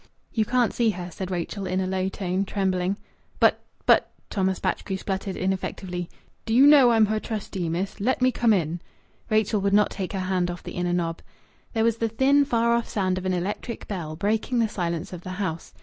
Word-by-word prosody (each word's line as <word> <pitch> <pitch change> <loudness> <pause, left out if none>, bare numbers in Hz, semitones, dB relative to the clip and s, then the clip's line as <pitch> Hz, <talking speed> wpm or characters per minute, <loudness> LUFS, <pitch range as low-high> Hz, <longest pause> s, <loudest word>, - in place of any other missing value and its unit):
"You 220 -2 +2
can't 245 0 +2
see 235 -2 +2
her," 180 -3 -4
said 185 +2 -5
Rachel 185 +2 -3
in 185 +1 0
a 190 - 0
low 185 0 -1
tone, 190 0 -1
trembling. 190 -1 0 0.4
"But - - +4 0.2
but - - +4
" - - -41
Thomas 190 -2 0
Batchgrew 190 - -2
spluttered, 190 0 -3
ineffectively. 185 -1 -3 0.4
"D'you 240 +5 +6
know 285 -4 +8
I'm 225 -2 +5
her 215 +1 0
trustee, 195 -6 -4
miss? 185 +6 -3
Let 250 +6 +1
me 255 0 +4
come 235 -2 +2
in." 170 -4 0 0.5
Rachel 215 -1 +2
would 200 0 +2
not 210 -1 +4
take 190 0 -4
her 195 - -2
hand 185 -1 0
off 175 -1 -6
the - - -7
inner 175 0 -1
knob. 170 -2 -1 0.5
There 225 -2 +1
was 230 0 +2
the 230 0 0
thin, 275 +5 +4
far 235 -2 +2
off 235 0 0
sound 185 -2 0
of 185 - -4
an 185 - +1
electric 200 +6 -4
bell, 165 -6 -4
breaking 215 +7 0
the 230 -1 +3
silence 170 -4 -3
of 175 - -7
the 185 +1 -6
house. 180 -5 -3
195 Hz, 210 wpm, -25 LUFS, 180-225 Hz, 0.5 s, know